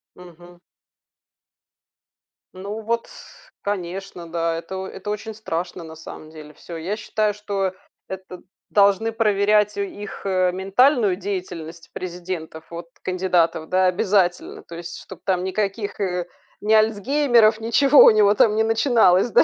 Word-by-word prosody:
Мгм. 175 0 -15 1.9
Ну 200 +4 -6
вот 230 +1 -2
с - - -16
конечно, 190 -2 -5
да, 165 0 -1
это 170 +3 -7
о 190 0 -4
это 200 +2 -8
очень 215 +1 -4
страшно 175 -4 -5
на 160 0 -10
самом 155 0 -11
деле. 155 -1 -12
Всё, 170 - -10
я 185 +7 -3
считаю, 215 -1 -1
что 200 -2 -2 0.3
это 190 -1 -8 0.3
должны 200 +2 +3
проверять 210 -1 +2
у 200 - 0
их, 205 +1 -7
э, 185 -2 +2
ментальную 200 +3 +3
деятельность 175 -4 -6
президентов, 175 -3 -6
вот 170 0 -7 0.2
кандидатов, 180 -3 0
да, 185 0 +3
обязательно, 185 -2 0
то 170 - -11
есть 170 0 -7
чтоб 185 -2 -12
там 185 -2 0
никаких, 200 +2 -2
э, 180 -3 -1 0.4
ни 215 +1 +2
альцгеймеров, 225 +1 +3
ничего 270 +6 +6
у - - +9
него 210 -1 +5
там 210 +1 +3
не 220 - +3
начиналось, 225 -3 +3
да. - - +6
195 Hz, 140 wpm, -22 LUFS, 175-215 Hz, 1.9 s, у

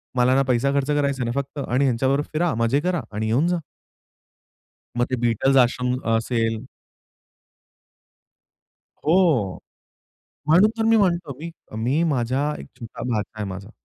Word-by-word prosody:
मला 125 0 +3
ना 135 - +4
पैसा 130 +2 +2
खर्च 140 -1 0
करायचा, 140 -3 0
ना 120 - -1
फक्त 140 +1 -4
आणि 125 +3 +1
ह्यांच्याबरोबर 135 +3 +1
फिरा, 165 0 +1
मजे 115 +4 +2
करा 180 -1 -1
आणि 110 +1 -2
येऊन 125 +9 +2
जा. 175 0 +1 1.4
मग 120 - +2
ते - - +2
Beatles 120 +3 +2
आश्रम 125 +1 -1 0.2
असेल 115 -1 -1 2.4
हो. 155 - +2 0.9
म्हणून 180 +8 +5
तर 225 - +1
मी 225 0 +4
म्हणतो, 175 -7 +1
मी 165 +3 -6 0.3
मी 135 +8 +1
माझा 130 +4 0
एक - - -9
छोटा 115 -1 -8
भाचा 105 -2 -2
आहे 105 - -2
माझा 100 +3 -8
135 Hz, 145 wpm, -23 LUFS, 115-155 Hz, 2.4 s, म्हणून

